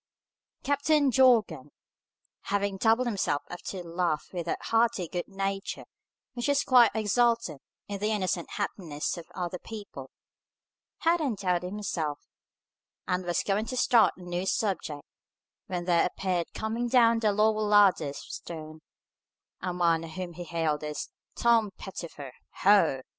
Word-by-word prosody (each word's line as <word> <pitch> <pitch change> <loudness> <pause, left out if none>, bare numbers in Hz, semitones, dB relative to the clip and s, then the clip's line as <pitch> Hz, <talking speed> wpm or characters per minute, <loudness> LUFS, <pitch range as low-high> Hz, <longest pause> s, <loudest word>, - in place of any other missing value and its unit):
Captain 285 0 +2
Jorgan, 220 - +3 0.8
having 200 -1 -1
doubled 225 +4 +3
himself 195 -10 -1
up 175 - -7
to 185 -2 -5
laugh 170 -3 -2
with 175 -2 -4
that - - 0
hearty 225 -5 +1
good 175 +2 -4
nature 195 0 -4 0.5
which 240 +2 -2
is 285 0 +3
quite 245 -3 +6
exultant 225 - +1 0.3
in 200 -1 -5
the 210 +2 0
innocent 185 -5 -1
happiness 170 -7 -3
of 170 -2 -9
other 180 -1 -3
people, 200 -12 -9 0.9
had 335 +1 +3
undoubted 185 - -1
himself, 165 -8 -3 0.9
and 180 0 -1
was 175 0 0
going 210 +3 0
to 255 - -4
start 235 -2 +4
a 185 - -12
new 180 +1 -3
subject, 180 -9 -1 0.6
when 175 -2 -3
there 175 -1 +3
appeared 180 -2 -2
coming 225 +2 -2
down 230 -2 +4
the 215 -2 +2
lower 215 +1 +2
ladders 200 -9 +4
of - - -9
stones, 155 -1 -8 0.8
a 180 - -2
man 170 -2 +2
whom 175 +2 -6
he 175 - -7
hailed 160 -3 -1
as 150 0 -4 0.3
"Tom 230 -3 +3
Pettifer, 160 -8 -8 0.3
Ho!" 185 -9 +5
190 Hz, 140 wpm, -28 LUFS, 170-220 Hz, 0.9 s, quite